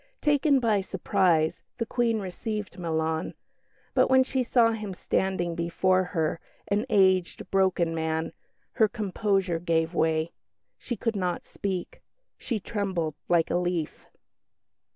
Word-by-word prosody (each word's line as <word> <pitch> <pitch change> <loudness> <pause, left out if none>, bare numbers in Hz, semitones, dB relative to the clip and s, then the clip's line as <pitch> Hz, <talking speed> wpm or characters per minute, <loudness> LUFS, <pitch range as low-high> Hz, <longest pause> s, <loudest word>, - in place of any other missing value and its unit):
Taken 290 -1 +3
by 220 -5 +2
surprise, 185 -4 +1 0.2
the 230 - -1
Queen 230 -1 +1
received 210 +1 -5
Milan, 160 -1 -1 0.6
but - - +3
when 260 0 +6
she 260 0 -1
saw 235 -2 +4
him 210 -4 -5
standing 180 -2 -1
before 185 +2 +1
her, 165 -3 -1 0.3
an 210 +5 0
aged, 190 -4 +2
broken 185 -3 +2
man, 160 0 -2 0.4
her 220 - +3
composure 195 -5 0
gave 165 -1 0
way. 160 0 +1 0.5
She 240 - -4
could 230 +1 -2
not 180 -3 -2
speak; 190 -3 -4 0.4
she 230 -4 -2
trembled 190 -7 -2 0.2
like 170 -2 +3
a - - +2
leaf. 175 -3 -2
185 Hz, 130 wpm, -27 LUFS, 170-215 Hz, 0.6 s, when